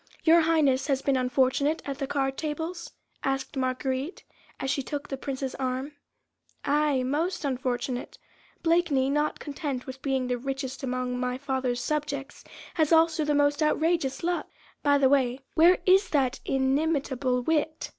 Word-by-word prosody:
"Your 335 +1 +6
Highness 295 -5 +2
has 275 -2 0
been 275 - +2
unfortunate 260 +4 +1
at 275 -1 -4
the 275 - -2
card 270 -1 -1
tables?" 325 +3 -4 0.3
asked 270 +1 -2
Marguerite, 260 +4 -2 0.4
as 270 - -1
she 280 - 0
took 290 +2 -5
the 270 - -3
Prince's 270 -1 -4
arm. 260 +2 -3 0.7
"Aye! 290 -2 +2
most 310 +6 -1
unfortunate. 255 -1 -2 0.5
Blakeney, 325 -6 +2
not 295 +1 0
content 280 -3 -4
with 265 0 -8
being 265 -2 0
the 250 -1 -1
richest 270 0 -4
among 250 -1 -2
my 250 0 -1
father's 260 -3 -2
subjects, 290 -2 -3 0.3
has 315 -2 +1
also 325 -1 +4
the 295 0 +1
most 290 +1 +2
outrageous 310 -2 +1
luck. 350 +1 -1 0.3
By 285 -1 +4
the 275 -1 +4
way, 260 -2 +2
where 345 +3 +6
is 380 0 +5
that 270 -3 +1
inimitable 270 -2 0
wit? 315 +1 0
275 Hz, 150 wpm, -27 LUFS, 260-305 Hz, 0.7 s, Your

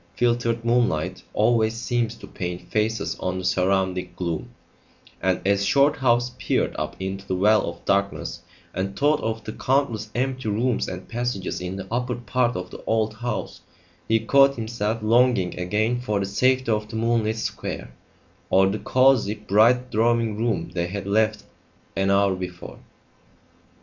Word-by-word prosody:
Filtered 120 -1 +1
moonlight 115 -10 +1
always 115 -2 +2
seems 120 -1 -1
to - - -11
paint 90 -1 -6
faces 110 +1 0
on 95 0 -2
the 95 - -4
surrounding 95 -1 +1
gloom, 85 -3 -3 0.7
and 95 0 +1
as 100 0 +2
Shorthouse 125 0 +3
peered - - 0
up - - -3
into 95 +1 -5
the 95 - -1
well 105 +4 +3
of - - -11
darkness 100 0 -1 0.3
and 95 +1 -3
thought 150 +1 +3
of 110 0 -3
the 110 - -6
countless 125 -6 0
empty 130 -2 -1
rooms 115 +4 0
and 90 0 -7
passages 120 -7 -3
in 90 +1 -4
the 95 -1 -6
upper 125 +1 -1
part 120 +1 0
of 90 0 -5
the - - -10
old 110 -1 +1
house, 120 0 -4 0.5
he 115 0 +3
caught 140 +4 +4
himself 110 -1 -3
longing 115 -5 +3
again 110 +7 0
for 105 -5 -1
the 100 - -1
safety 130 +5 +2
of 105 0 -1
the - - -7
moonlit 110 -1 +1
square, 110 - -4 0.6
or 95 +1 +5
the 100 +2 -1
cosy, 130 -5 +3
bright 115 +5 +3
drawing 115 0 +2
room 115 +1 -1
they 85 -1 -1
had 100 +1 -5
left 110 +1 +1 0.5
an 95 0 +1
hour 100 0 +3
before. 90 -1 -7
110 Hz, 155 wpm, -24 LUFS, 95-120 Hz, 0.7 s, or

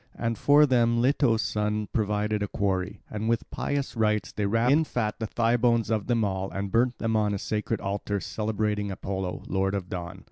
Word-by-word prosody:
And 115 0 -1
for 145 +5 +5
them 120 -3 +3
Leto's 125 -2 +3
son 105 0 -1
provided 105 -1 0
a 105 - 0
quarry; 95 0 -2
and 110 +1 -3
with 115 -1 0
pious 140 -2 -2
rites 105 -4 +1
they 105 -1 -1
wrapped 115 +4 +2
in 155 +3 +5
fat 110 -8 -2
the 110 - -2
thigh 115 +2 +1
bones 115 -2 +2
of 110 -2 0
them 115 -3 +2
all 95 -1 -2
and 100 0 -4
burnt 120 +2 +2
them 115 -1 -1
on 105 -1 +2
the - - -1
sacred 105 +2 -2
altar, 100 +1 -2
celebrating 105 +1 -2
Apollo, 95 -1 -4
Lord 95 +1 0
of 95 -2 -4
Dawn. 90 -1 -5
105 Hz, 200 wpm, -27 LUFS, 100-115 Hz, -, for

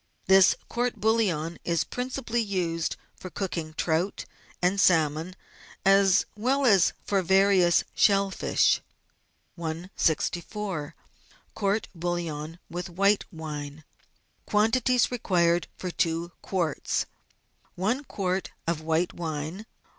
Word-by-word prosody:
This 190 -1 +6
court 245 +1 -1
bouillon 185 -8 0
is 170 -2 +1
principally 250 -1 -3
used 175 -6 -1 0.2
for 185 - -9
cooking 165 -5 -4
trout 170 +5 -1 0.3
and 185 +2 +2
salmon, 160 +1 +2 0.5
as 195 -1 +5
well 265 +6 +1
as 200 -7 +5
for 195 -2 +1
various 190 -1 +4
shell 195 -1 +3
fish. - - +2 0.8
164— 170 +1 -2 0.6
COURT=BOUiLLON 175 -6 -2
WITH 180 +2 -5
WHITE 200 +4 +2
WINE 150 -2 -7 0.6
Quantities 240 +4 +2
Required 175 -7 +1
for 180 - -4
Two 170 +1 -1
Qtiarts. 170 -6 -1 0.7
I 220 +9 +1
quart 185 -1 -2 0.2
of 165 -2 -1
white 160 +2 0
wine. 160 +5 -5
180 Hz, 100 wpm, -27 LUFS, 165-200 Hz, 0.8 s, This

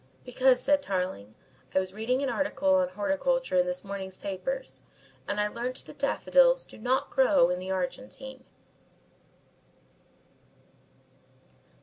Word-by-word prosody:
"Because," 255 0 +3
said 285 0 +2
Tarling, 180 - -3 0.4
"I - - +6
was 185 0 -4
reading 245 +6 -1
an 275 - 0
article 285 +2 +1
on 280 -1 +3
horticulture 290 - 0
in 270 - +2
this 270 0 -3
morning's 195 -2 -6
papers 200 - -5 0.5
and 205 - -2
I 210 - +2
learnt 245 +4 -5
that - - -13
daffodils - - +3
do - - -14
not 255 +4 0
grow 265 - +4
in 180 - -1
the 185 +1 -6
Argentine." 255 +8 -5
255 Hz, 125 wpm, -28 LUFS, 190-275 Hz, 0.5 s, I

